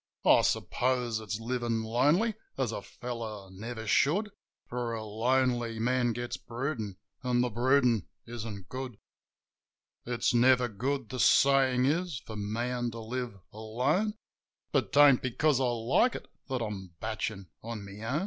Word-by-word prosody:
I - - +7
suppose 125 -3 0
it's 110 0 -4
livin' 115 -1 -1
lonely, 145 - +2 0.2
as 130 -4 0
a 105 - -4
fellow 110 -4 -6
never 110 +4 -7
should; 185 - +2 0.3
For 120 -1 -3
a 110 - -5
lonely 120 +1 +1
man 120 +1 +1
gets 120 +1 -4
broodin', 115 -6 -4 0.3
an' 125 -1 +2
the 125 -1 0
broodin' 125 -2 +3 0.2
isn't 110 -5 -7
good. 130 -2 -6 1.1
It's 120 0 0
never 125 +1 +5
good, 125 +3 -2
the 130 - -5
sayin' 130 -2 +5
is, 165 +1 0
for 110 - -7
man 120 +4 -2
to 115 0 -7
live 120 -1 -4 0.2
alone. 130 - 0 0.6
But - - +1
'tain't 140 -3 +7
because 135 +2 +2
I - - +3
like 120 - +2
it - - -7 0.2
that 130 -3 -1
I'm 95 -5 -6
batchin' 110 -5 -4
on 115 -3 -6
my 100 +2 -9
own. 130 +7 0
120 Hz, 145 wpm, -30 LUFS, 110-130 Hz, 1.1 s, I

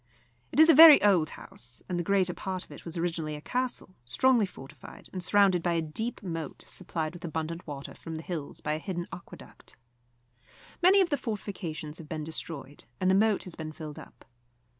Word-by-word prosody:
It - - -1
is 315 - +9
a 330 - +8
very 315 0 +11
old 180 -7 +4
house, 125 0 -9
and 175 -1 -2
the - - -1
greater 185 -1 +2
part 185 0 -4
of - - -19
it - - -11
was 170 0 -4
originally 165 -3 -2
a - - -7
castle, 250 -2 -3
strongly 230 - +3
fortified, 135 -7 -12
and 185 -1 -4
surrounded 195 -3 +4
by 175 0 0
a 165 - +1
deep 220 +10 -4
moat 165 -5 -5
supplied 165 -3 -4
with 175 +1 -11
abundant 165 +1 -4
water 140 -2 -7
from 165 -1 -8
the 160 - -6
hills 160 -5 -6
by 150 - -1
a 155 - -2
hidden 175 -1 -4
aqueduct. 180 - -12 1.1
Many 380 +3 +6
of 350 -3 +1
the 290 - +2
fortifications 180 - -5
have 155 -2 -11
been 155 -1 -4
destroyed, 155 -2 -6
and 185 0 +3
the - - +4
moat 210 +1 +3
has 180 - -8
been 155 -1 -6
filled 155 -2 -8
up. - - -15
175 Hz, 200 wpm, -29 LUFS, 155-200 Hz, 1.1 s, very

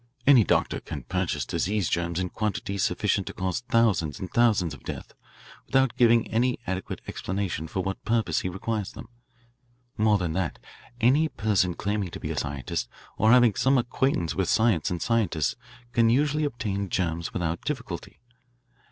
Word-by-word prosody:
Any 135 -5 +7
doctor - - +1
can - - -7
purchase 90 -7 -1
disease 100 - 0
germs 85 0 -1
in 90 -1 -1
quantities 100 -2 -2
sufficient - - 0
to - - -5
cause 90 -1 -2
thousands 105 -10 +2
and 95 - -6
thousands 105 -9 +3
of 70 - -11
deaths - - -7 0.5
without 135 -2 +2
giving 115 -1 +4
any 125 +3 +2
adequate 95 0 -4
explanation 95 -4 -3
for 95 +3 -3
what 95 +1 -4
purpose 115 0 +1
he 90 - -3
requires 100 +2 -3
them. - - -10 0.9
More 105 -1 +4
than 90 -4 -2
that, 90 -2 -2 0.4
any 140 +7 +4
person 100 - +1
claiming 100 -2 -2
to - - -8
be - - -4
a - - -3
scientist 65 -3 -3 0.3
or 110 - +3
having 120 -3 +6
some 135 +5 +3
acquaintance 120 -7 0
with 95 -2 -1
science 110 -8 +3
and 90 - -2
scientists 95 - +1 0.4
can 115 -2 +3
usually 150 +5 +2
obtain 105 -7 -3
germs 85 -2 -1
without 85 -2 -2
difficulty. 125 - -5
100 Hz, 160 wpm, -26 LUFS, 90-115 Hz, 0.9 s, Any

